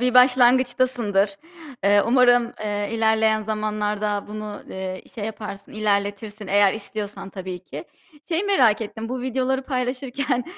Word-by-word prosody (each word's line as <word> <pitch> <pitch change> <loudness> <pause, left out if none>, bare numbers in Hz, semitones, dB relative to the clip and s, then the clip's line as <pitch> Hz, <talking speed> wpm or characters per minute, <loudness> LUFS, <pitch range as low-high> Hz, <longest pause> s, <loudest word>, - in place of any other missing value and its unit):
eee, 250 - 0
başlangıçtasındır. 245 -5 +4 0.5
Eee, 205 0 +5
umarım, 245 -1 +4
eee, 205 -1 -2
ilerleyen 220 -1 +3
zamanlarda 210 -1 -2
bunu, 210 -1 -6
eee, 185 0 -5
şey 215 - -4
yaparsın, 210 -2 -7
ilerletirsin. 205 0 -1
Eğer 200 0 +4
istiyorsan 210 -2 -6
tabii 185 -2 -6
ki. - - -8 0.4
Şeyi 345 +3 0
merak 250 - +4
ettim. 220 +1 -5
Bu 255 0 -3
videoları 260 +1 0
paylaşırken, 255 0 -2
220 Hz, 125 wpm, -23 LUFS, 205-250 Hz, 0.5 s, Eee